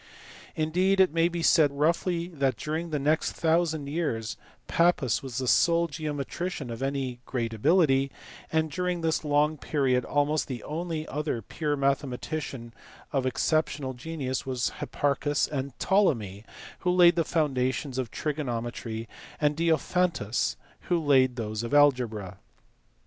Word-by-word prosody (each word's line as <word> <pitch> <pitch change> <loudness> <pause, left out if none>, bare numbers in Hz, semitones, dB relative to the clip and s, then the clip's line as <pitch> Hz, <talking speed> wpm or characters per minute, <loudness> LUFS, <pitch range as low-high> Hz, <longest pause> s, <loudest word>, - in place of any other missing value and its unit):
Indeed 180 +5 +1
it 185 -5 +5
may 165 0 +3
be 170 -1 -3
said 150 -4 +5
roughly 170 +3 +1
that 140 -6 0
during 160 +2 -3
the 155 - -1
next 150 +3 +1
thousand 160 -2 +1
years 115 -9 -2 0.3
Pappus 165 -9 +2
was 130 -3 -6
the 130 -1 -2
sole 170 +5 +4
geometrician 150 -1 -4
of 115 - -6 0.4
great 115 -3 -3
ability; 140 - +3 0.4
and 160 -1 +1
during 180 +1 -1
this 160 0 0
long 150 +1 +2
period 130 -4 +1
almost 145 +1 0
the 130 -4 -5
only 160 0 -4
other 145 -6 -3
pure 150 +6 -2
mathematicians 135 -2 -2 0.4
of 135 -2 +1
exceptional 145 0 0
genius 130 0 -4
were 130 -1 -4 0.2
Hipparchus 145 0 0
and 135 -2 -4
Ptolemy 115 - +1 0.3
who 180 - -1
laid 175 -1 +6
the 170 - +2
foundations 135 -4 -1
of 125 -3 -2
trigonometry, 120 -6 -4 0.3
and 150 0 +2
Diopharitus 165 - +1 0.3
who 175 - +3
laid 130 -5 +3
those 110 -2 -3
of 120 +4 -2
algebra. 115 -10 +2
145 Hz, 135 wpm, -27 LUFS, 130-165 Hz, 0.4 s, laid